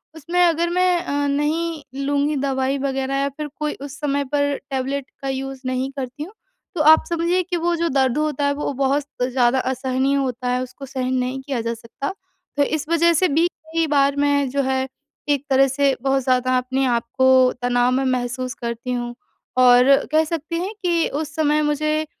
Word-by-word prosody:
उसमें 335 +3 -3
अगर 340 0 +1
मैं 360 0 +2
अ, 285 -3 -1
नहीं 305 +2 -1 0.2
लूँगी 285 +1 +1
दवाई 270 0 0
वग़ैरह 270 0 -2
या 275 0 0
फिर 295 +2 -6
कोई 300 0 -1
उस 280 +1 -8
समय 285 -1 0
पर 285 -1 +1
टैबलेट 270 0 -2 0.2
का 275 - -3
यूज़ 270 0 -4
नहीं 255 +1 -1
करती 270 +2 -5
हूँ, 370 +7 -10 0.4
तो 320 - 0
आप 315 +1 +7
समझिए 340 +2 +1
कि 355 0 -3
वो 345 +1 0
जो 335 0 0
दर्द 265 -1 +1
होता 300 -2 0
है 285 - +2
वो 290 0 -3
बहुत 275 +2 +1 0.2
ज़्यादा 250 0 +2
असहनीय 260 +1 0
होता 255 -2 -2
है, 250 0 0
उसको 255 +2 -9
सहन 260 -1 -3
नहीं 255 +1 -2
किया 265 -3 -3
जा 230 +1 -2
सकता। 235 +8 -6 0.4
तो 285 - +4
इस 305 +1 -2
वज़ह 335 0 +4
से 365 +3 +3
भी 325 +3 +2
कई 325 -1 -3
बार 280 -1 +3
मैं 285 -1 +1
जो 280 +2 0
है 265 0 0 0.4
एक 285 -1 +1
तरह 270 0 +5
से 275 0 +1
बहुत 270 0 +1
ज़्यादा 255 0 +2
अपने 260 +2 0
आप 235 -2 +1
को 260 -1 +5
तनाव 245 0 +2
मैं 265 +1 +1
महसूस 255 0 -2
करती 235 +1 -4
हूँ 240 -1 -4 0.4
और 250 +2 +7 0.2
कह 310 +1 +4
सकते 325 +1 -4
हैं 365 +5 -3
कि 340 -2 +2
उस 300 +1 -4
समय 305 -1 +2
मुझे 305 +1 0
275 Hz, 195 wpm, -21 LUFS, 260-305 Hz, 0.4 s, आप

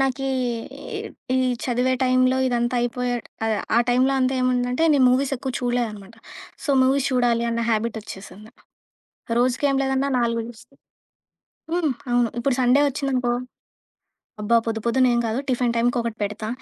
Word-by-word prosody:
నాకీ 270 0 0 0.7
ఇ - - -2 0.4
ఈ - - +3 0.3
చదివే 250 +1 +1
టైం‌లో 255 0 +3
ఇదంతా 240 0 0
అయిపోయే 245 +1 -1 0.3
ఆహ్, 220 +1 +1
టైంలో 255 +2 +3
అంతా 260 +1 +1
ఏముందంటే, 250 +2 0
నేను 275 -3 +4
మూవీస్ 265 +2 +1
ఎక్కువ 265 +2 -4
చూడలేదన్నమాట. 230 -4 -3 0.5
సో, - - -1
మూవీస్ 270 +1 +2
చూడాలి 240 -2 +2
అన్న 230 0 -1
హాబిటొచ్చేసింది. 215 -2 -4 0.9
రోజుకి 250 +3 +1
ఏం 275 - +1
లేదన్న 270 +1 0
4 235 -1 0
జూస్తా. 245 +3 -14 1.0
హ్మ్. 335 -4 +1 0.2
అవును. 240 -1 +2
ఇప్పుడు 250 +2 +1
సండే 250 +3 +4
ఒచ్చిందనుకో 260 -3 -1 1.1
అబ్బా! 210 +3 +2
పొద్దు 225 -1 -2
పొద్దున 255 +2 +3
ఏం 235 - +2
కాదు. 225 +2 -1
టిఫిన్ 245 -1 +1
టైమ్‌కి 240 +1 +1
ఒకటి 230 -1 -4
పెడతా, 210 +1 -4
245 Hz, 140 wpm, -23 LUFS, 235-260 Hz, 1.1 s, నేను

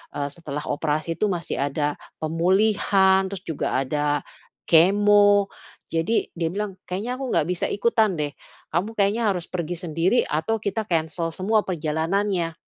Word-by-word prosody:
eee, 145 0 -2
setelah 150 -2 -6
operasi 155 +2 -1
tuh 215 - +2
masih 175 -2 -3
ada 145 +1 -1 0.3
pemulihan, 190 +3 +3
terus 195 -2 -6
juga 160 -3 -2
ada 145 +1 0 0.5
kemo," 205 +3 +5 0.4
jadi 165 +8 0
dia 165 -1 0
bilang, 200 -1 -4
"kayaknya 215 +8 -3
aku 270 - -3
nggak 165 -2 +2
bisa 180 -1 0
ikutan 220 -1 +2
deh, 150 -1 0 0.4
kamu 185 +5 0
kayaknya 205 +3 +2
harus 175 -2 -5
pergi 175 -1 -3
sendiri 170 +10 +2
atau 160 +9 0
kita 215 +1 -2
cancel 165 -1 -1
semua 210 +5 +1
perjalanannya." 170 +2 -1
180 Hz, 140 wpm, -24 LUFS, 160-205 Hz, 0.5 s, kemo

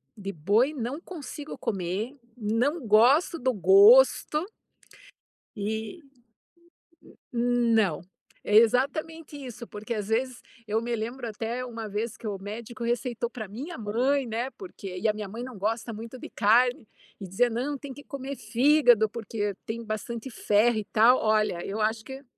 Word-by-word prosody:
de 195 -1 -5
boi 205 - +2
não 260 +3 -4
consigo 305 -4 -8
comer, 195 +6 -3 0.2
não 240 +7 0
gosto 255 +11 +4
do 255 0 +1
gosto 390 - +6 1.1
e, 220 - -4 1.3
n 240 -1 +1
não, 195 -9 +2 0.4
é 210 - 0
exatamente 290 +7 +1
isso, 245 -4 -8
porque 215 +3 -6
às 210 -1 -4
vezes 250 +2 -1 0.3
eu 220 +2 0
me 240 0 -3
lembro 235 +4 -5
até 230 +3 -4
uma 230 -3 -6
vez 215 +2 -3
que 225 - -7
o 200 -2 -3
médico 215 +4 -7
receitou 240 0 -1
pra 225 -3 -7
minha 275 - -7
mãe, 245 +6 0
né, 230 +3 -2
porque 200 - -9
e 180 - 0
a 215 - +3
minha 210 -2 -6
mãe 230 +4 -7
não 250 -5 -8
gosta 225 +3 -2
muito 230 +4 -8
de - - -9
carne 235 +3 +3 0.3
e 195 - -7
dizia: 190 +7 +2
"Não, 255 +5 -2
tem 275 -1 -8
que 285 - -12
comer 275 0 -6
fígado, 245 -5 +4
porque 210 -2 -3
tem 230 +1 -5
bastante 225 +4 -5
ferro 220 +1 +2
e 215 - -3
tal", 235 +4 +5
olha, 215 -5 +1
eu 205 +3 -4
acho 220 +1 0
que 265 +3 -9
235 Hz, 160 wpm, -27 LUFS, 215-260 Hz, 1.3 s, gosto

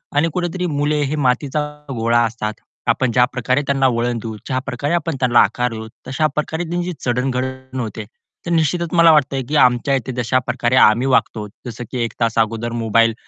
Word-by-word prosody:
आणि 155 +3 +3
कुठेतरी 180 0 -2
मुले 145 0 0
हे 145 +2 -1
मातीचा 140 +2 0 0.3
गोळा 115 0 +2
असतात, 110 -2 -3 0.3
आपण 130 -3 +2
ज्या 125 +1 +4
प्रकारे 130 +3 +1
त्यांना 135 -1 +3
वळणं 120 0 -1
देऊ, 110 -1 -5
ज्या 130 - -1
प्रकारे 140 +4 -2
आपण 165 -3 -1
त्यांना 125 -2 +4
आकार 125 -1 +2
देऊ, 110 0 -6 0.2
तशा 155 +4 +1
प्रकारे 160 +3 -2
त्यांची 175 +1 -2
चढण 125 +2 0
घढण 130 0 -4
होते. 110 -2 -4 0.4
तर 170 - -3
निश्चितच 165 +1 +1
मला 170 -1 +7
वाटतंय 140 -3 +2
की 155 - -1
आमच्या 125 +3 +2
इथे 130 0 -3
तशा 130 +2 +2
प्रकारे 120 +2 +1
आम्ही 120 +3 +5
वागतो, 105 -4 +1 0.2
जसं 120 +1 -6
की 125 - -3
1 115 - -3
तास 115 -1 +1
अगोदर 115 +1 0
मोबाईल 115 +1 +3
130 Hz, 190 wpm, -19 LUFS, 120-150 Hz, 0.4 s, मला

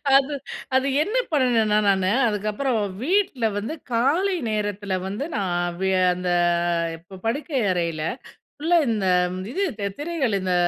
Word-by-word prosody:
அது, 275 +2 +4 0.4
அது 265 +1 +3 0.2
என்ன 430 +7 -4 0.2
பண்ணணுன்னா 230 -7 +3
நானு, 190 0 +2 0.2
அதுக்கப்புறம் 215 +4 -1 0.2
வீட்ல 345 - +1
வந்து 225 +10 -3 0.2
காலை 330 +12 +2 0.2
நேரத்துல 205 -2 -2
வந்து 205 +8 -3
நான் 175 -2 -1
வி 190 0 +2 0.2
அந்த 180 0 -3 0.7
இப்ப 185 +3 -13
படுக்கை 275 +2 -1
அறையில, 170 -3 -1 0.6
ஃபுல்லா 340 +3 +3
இந்த 210 -4 0 0.4
இது 375 - -4
இருக்கே 210 - -3
திரைகள் 295 -8 -1
இந்த 185 -1 0
220 Hz, 130 wpm, -23 LUFS, 190-285 Hz, 0.7 s, அது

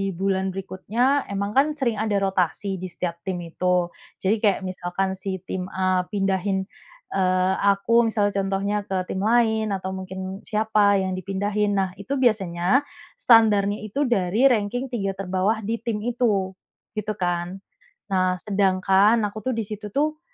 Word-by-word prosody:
bulan 190 +1 0
berikutnya, 225 +9 0
emang 200 0 -2
kan 270 +6 +4
sering 235 -7 -1
ada 215 -2 0
rotasi 190 0 0
di 185 - -5
setiap 170 -1 -3
tim 185 -2 -3
itu, 180 +1 0 0.3
jadi 195 +3 +2
kayak 210 -3 +2
misalkan 185 +1 -2
si 190 -1 -4
tim 185 -1 -3
A 185 -1 +1
pindahin, 195 -1 0 0.5
eee, 185 0 +2 0.2
aku 230 +4 +3
misalnya 210 -2 +1
contohnya 195 +1 -1
ke 190 -2 -3
tim 190 - -3
lain, 220 -1 +2
atau 190 -1 -3
mungkin 190 +1 -6
siapa 210 -2 +2
yang 190 -1 -1
dipindahin. 205 +2 -1
Nah, 190 -1 +1
itu 260 +8 -3
biasanya 200 0 +2 0.3
standarnya 210 -3 +4
itu 215 +7 -2
dari 205 +1 +1
ranking 245 +4 -1
3 195 -5 -2
terbawah 195 +3 -1
di 225 +3 -2
tim 220 -2 -3
itu, 225 -6 0 0.5
gitu 215 0 -3
kan. 180 0 -2 0.5
Nah, 185 -1 +2
sedangkan 195 +2 +3
aku 210 +1 -3
tuh - - -1
di 225 - -1
situ 210 0 -6
tuh, 305 +2 0
195 Hz, 150 wpm, -24 LUFS, 190-215 Hz, 0.5 s, kan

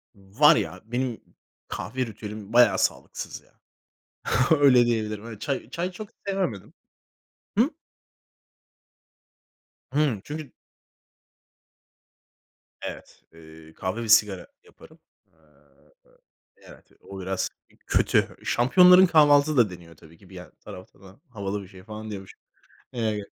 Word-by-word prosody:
Var 95 0 +4
ya, 90 +3 -3
benim 120 0 -3 0.5
kahve 130 0 -4
ritüelim 105 -1 -9
bayağı 120 -6 +5
sağlıksız - - -3
ya. - - -31 1.0
Öyle 130 -4 +6
diyebilirim 110 -2 -2
evet. 110 -3 -10
Çay 140 -2 -3
çay 175 +2 -3
çok 205 +3 -9 0.2
sevemedim. 185 - -3 0.9
Hı? - - +4 2.2
Hımm. 140 -7 0
Çünkü 150 -3 -8 2.3
Evet, - - -9
eee, 80 -1 -15
kahve 95 +8 -4
ve 110 - -6
sigara 105 -3 +4 0.2
yaparım. 445 - -19 0.3
Iıı, - - -30 0.6
evet, - - -17
o 95 -1 -9
biraz 95 0 -2 0.4
kötü. - - +1
Şampiyonların 180 +9 +6
kahvaltısı 150 -3 +4
da 115 -4 +5
deniyor 85 -2 -13
tabii 80 +1 -18
ki. 95 - -20
Bir 95 - -13
yan 90 0 -11
taraftan 95 +3 -14
havalı 100 -3 -5
bir - - -13
şey 95 -1 -15
falan 110 +1 -8
diyormuşum. 95 -2 -9 0.5
Eee 110 -4 -2
110 Hz, 115 wpm, -25 LUFS, 95-135 Hz, 2.3 s, Öyle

